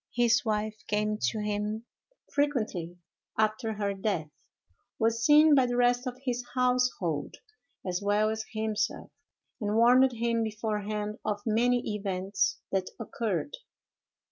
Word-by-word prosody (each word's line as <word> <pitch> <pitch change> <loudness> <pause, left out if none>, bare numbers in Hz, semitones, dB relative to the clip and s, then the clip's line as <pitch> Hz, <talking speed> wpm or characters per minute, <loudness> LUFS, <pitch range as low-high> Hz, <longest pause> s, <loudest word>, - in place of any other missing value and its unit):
His 240 -1 +3
wife 215 -1 -2
came 210 0 0
to 225 - -2
him 210 +2 -2 0.5
frequently 215 - -1 0.4
after 220 +1 +1
her 200 -1 -1
death; 190 -6 -2 0.7
was 230 0 +1
seen 300 +3 +7
by 265 -3 +5
the 245 0 -1
rest 245 +1 +3
of 250 0 -4
his 245 -1 -1
household, 250 - 0 0.5
as 180 0 -2
well 205 +1 +2
as 220 0 -3
himself; 220 -2 -2 0.5
and 210 -2 -1
warned 250 +3 +5
him 230 0 0
beforehand 210 0 -3
of 205 -1 -2
many 240 0 +1
events 195 -1 -1
that 190 -1 0
occurred. 200 -9 -3
215 Hz, 125 wpm, -29 LUFS, 205-240 Hz, 0.7 s, seen